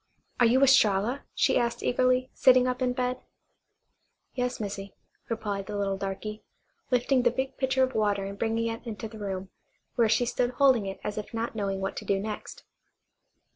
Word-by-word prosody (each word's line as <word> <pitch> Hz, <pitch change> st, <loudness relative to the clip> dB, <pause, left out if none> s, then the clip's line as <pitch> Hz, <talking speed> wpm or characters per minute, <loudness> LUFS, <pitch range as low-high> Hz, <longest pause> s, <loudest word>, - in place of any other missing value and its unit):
"Are 240 Hz, -, +6 dB
you 260 Hz, +4 st, +4 dB
Estralla?" 245 Hz, -2 st, +3 dB
she -, -, +3 dB
asked 235 Hz, 0 st, -1 dB
eagerly, 255 Hz, +1 st, +2 dB
sitting 255 Hz, -1 st, +5 dB
up 250 Hz, +1 st, -2 dB
in 250 Hz, -1 st, +2 dB
bed. 250 Hz, 0 st, -2 dB, 1.1 s
"Yas, 250 Hz, -1 st, -2 dB
Missy," 200 Hz, -2 st, -5 dB, 0.3 s
replied 205 Hz, -4 st, -3 dB
the 210 Hz, -, -4 dB
little 200 Hz, -1 st, 0 dB
darky, 195 Hz, +2 st, -5 dB, 0.5 s
lifting 250 Hz, +1 st, +2 dB
the 245 Hz, -, +4 dB
big 265 Hz, +2 st, -3 dB
pitcher 265 Hz, 0 st, +2 dB
of 260 Hz, 0 st, 0 dB
water 205 Hz, -2 st, +1 dB
and 200 Hz, 0 st, -7 dB
bringing 230 Hz, 0 st, 0 dB
it 230 Hz, 0 st, -4 dB
into 220 Hz, 0 st, -5 dB
the 220 Hz, 0 st, -11 dB
room, 190 Hz, -2 st, -5 dB, 0.4 s
where 230 Hz, -2 st, +3 dB
she 225 Hz, +3 st, +3 dB
stood 245 Hz, +1 st, 0 dB
holding 255 Hz, -7 st, +4 dB
it 195 Hz, -, -6 dB
as 210 Hz, 0 st, -3 dB
if 210 Hz, +2 st, -8 dB
not 230 Hz, +1 st, -2 dB
knowing 195 Hz, -3 st, -2 dB
what 195 Hz, -, -3 dB
to -, -, -5 dB
do 195 Hz, -1 st, +1 dB
next. 210 Hz, +1 st, -6 dB
230 Hz, 180 wpm, -28 LUFS, 200-250 Hz, 1.1 s, Are